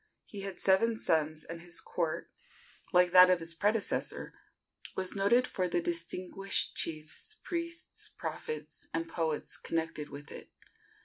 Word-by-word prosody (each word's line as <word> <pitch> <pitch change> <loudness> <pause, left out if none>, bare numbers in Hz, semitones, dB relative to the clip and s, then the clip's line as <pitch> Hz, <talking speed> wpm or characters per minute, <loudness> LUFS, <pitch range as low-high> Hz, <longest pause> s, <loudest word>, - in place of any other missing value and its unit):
He 205 - -8
had 195 -2 -6
seven 220 +4 +4
sons, 155 -4 +1
and 165 0 -8
his 175 0 0
court, 170 -1 -2 0.6
like 180 -2 +5
that 185 0 +9
of 180 -1 +4
his 165 0 -3
predecessor, 210 +5 +1 0.6
was 185 -1 -2
noted 205 +6 +4
for 185 -6 -1
the 175 - +1
distinguished 180 +3 -1
chiefs, 160 - -2
priests, 335 -1 -3
prophets 465 0 -5
and 330 - -1
poets 160 - -1
connected 160 -2 -3
with 145 +1 -8
it. - - -9
180 Hz, 135 wpm, -32 LUFS, 165-200 Hz, 0.6 s, that